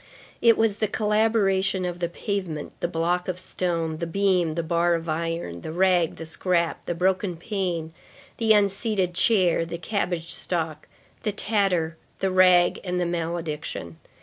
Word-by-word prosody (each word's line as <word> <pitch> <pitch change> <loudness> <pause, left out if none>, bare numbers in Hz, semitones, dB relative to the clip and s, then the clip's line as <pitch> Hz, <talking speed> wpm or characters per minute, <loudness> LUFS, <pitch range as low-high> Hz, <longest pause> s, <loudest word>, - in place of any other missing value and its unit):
It 230 -1 +6
was 220 -2 +2
the 215 - +2
collaboration 205 -3 +1
of 175 0 -4
the 170 -1 -1
pavement, 175 -4 -4
the - - 0
block 175 +2 -1
of 185 -1 -2
stone, 170 -3 -2
the 170 +1 -3
beam, 180 -2 +1
the 170 +1 -2
bar 170 +1 +2
of 165 0 -4
iron, 165 - -3
the - - -6
rag, 180 -1 +2
the 165 - -8
scrap, 170 +1 0
the 175 - -1
broken 185 0 0
pane, 175 -4 -3 0.4
the 225 -1 +2
unseated 200 -2 +2
chair, 180 -4 +3
the 170 +1 -5
cabbage 175 -2 -2
stalk, 160 -3 -3 0.3
the 215 - -1
tatter, 190 -6 0 0.2
the 190 -1 0
rag, 180 -1 +5
and 180 -1 -2
the 175 - +1
malediction. 165 - -4
175 Hz, 155 wpm, -25 LUFS, 165-195 Hz, 0.4 s, It